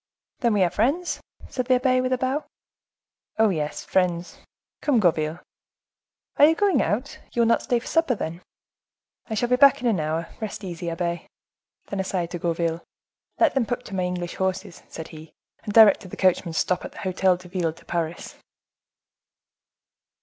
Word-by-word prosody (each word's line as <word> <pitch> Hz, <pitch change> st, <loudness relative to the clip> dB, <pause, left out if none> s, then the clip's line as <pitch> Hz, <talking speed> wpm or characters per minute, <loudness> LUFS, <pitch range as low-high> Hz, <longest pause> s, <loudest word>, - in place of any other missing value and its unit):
"Then 235 Hz, -5 st, +2 dB
we 195 Hz, -, +4 dB
are 175 Hz, -, +1 dB
friends?" 280 Hz, -, 0 dB, 0.3 s
said 255 Hz, -1 st, -3 dB
the 255 Hz, -, +5 dB
abbe, 255 Hz, 0 st, +2 dB
with 255 Hz, 0 st, -1 dB
a 255 Hz, -, +2 dB
bow. 260 Hz, +4 st, -1 dB, 0.9 s
"Oh, 220 Hz, -1 st, +4 dB
yes, 150 Hz, -5 st, -3 dB
friends. 175 Hz, -2 st, 0 dB, 0.4 s
Come, 280 Hz, -6 st, +3 dB
Gourville." 160 Hz, -3 st, +1 dB, 1.0 s
"Are 290 Hz, -, +8 dB
you 320 Hz, +2 st, +4 dB
going 405 Hz, 0 st, +3 dB
out? 245 Hz, +7 st, -2 dB
You 235 Hz, -, +3 dB
will -, -, +3 dB
not 230 Hz, -, +3 dB
stay 245 Hz, -3 st, +1 dB
to -, -, -14 dB
supper, 325 Hz, -6 st, +1 dB
then?" 170 Hz, -3 st, -5 dB, 0.9 s
"I 220 Hz, -, -2 dB
shall 240 Hz, +3 st, 0 dB
be 250 Hz, -, +3 dB
back 280 Hz, 0 st, +6 dB
in 250 Hz, -, -6 dB
an 215 Hz, -7 st, +2 dB
hour; 160 Hz, +2 st, -2 dB
rest 215 Hz, -1 st, -5 dB
easy, 175 Hz, -2 st, -5 dB
abbe." 170 Hz, 0 st, -3 dB, 0.6 s
Then 200 Hz, -, -5 dB
aside 185 Hz, -3 st, -2 dB
to 175 Hz, -, -4 dB
Gourville,—"Let 170 Hz, -, -2 dB
them 260 Hz, -5 st, +1 dB
put 245 Hz, 0 st, -3 dB
to 200 Hz, -, -7 dB
my 185 Hz, -, 0 dB
English 175 Hz, -1 st, -4 dB
horses," 190 Hz, 0 st, -3 dB
said 160 Hz, 0 st, -8 dB
he, 160 Hz, -1 st, -12 dB, 0.3 s
"and 210 Hz, -, -4 dB
direct 210 Hz, -3 st, +6 dB
the -, -, -9 dB
coachman 185 Hz, -2 st, +2 dB
to -, -, +2 dB
stop 180 Hz, -, 0 dB
at -, -, -8 dB
the -, -, -15 dB
Hotel 185 Hz, 0 st, +2 dB
de 180 Hz, 0 st, -14 dB
Ville 175 Hz, -3 st, -1 dB
de 160 Hz, -, -18 dB
Paris." 170 Hz, -1 st, -4 dB
190 Hz, 180 wpm, -24 LUFS, 170-245 Hz, 1.0 s, Are